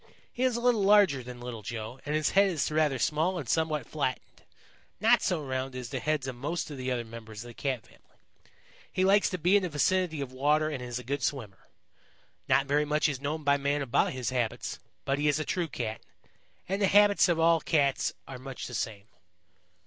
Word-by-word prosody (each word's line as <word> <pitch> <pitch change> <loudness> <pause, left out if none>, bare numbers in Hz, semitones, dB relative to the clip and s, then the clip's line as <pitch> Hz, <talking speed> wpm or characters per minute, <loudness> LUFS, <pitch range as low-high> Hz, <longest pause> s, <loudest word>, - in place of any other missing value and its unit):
He 245 - -6
is 255 -2 +2
a - - -3
little 240 -3 +3
larger 195 -9 +5
than 125 0 -9
Little 120 -2 -6
Joe, 110 +4 -6
and 150 - 0
his 155 -1 +1
head 195 0 +5
is 155 -4 -1
rather 150 -3 +2
small 155 +9 +1
and 145 -8 -5
somewhat 155 0 0
flattened, 140 -4 -3 0.6
not - - +5
so 170 -4 0
round 130 0 -3
as 125 -2 -6
the 135 - -3
heads 150 +1 -1
of 130 - -4
most 150 +6 -3
of 145 - -7
the 130 0 -3
other 120 -2 -1
members 110 -1 -9
of 120 - -10
the - - -10
Cat 130 -2 -3
family. - - -24 0.7
He 185 - +1
likes 200 +1 +4
to 185 - -3
be 180 +4 +3
in 205 - +5
the 180 - -2
vicinity 165 +1 +1
of 135 -2 -4
water 150 +4 +2
and 145 -5 -4
is 120 -1 -4
a 125 - -6
good 140 +4 -3
swimmer. 110 -9 -4 0.8
Not 135 - +4
very 145 +2 +2
much 150 +1 +1
is 140 -3 -3
known 150 +2 -3
by 140 0 +3
man 140 +1 0
about 120 - +1
his 130 -1 -3
habits, 120 -3 -2 0.3
but 135 +1 0
he 150 - +1
is 150 +1 +2
a 155 - -2
true 175 -2 -1
Cat, 115 -6 -4 0.7
and 195 +2 -2
the 200 - +4
habits 205 -1 +5
of 170 -1 +1
all 165 0 +4
Cats 140 -4 +1 0.2
are 130 -2 -8
much 135 0 -7
the 125 - -8
same." 105 -3 -3
145 Hz, 220 wpm, -29 LUFS, 125-165 Hz, 0.8 s, larger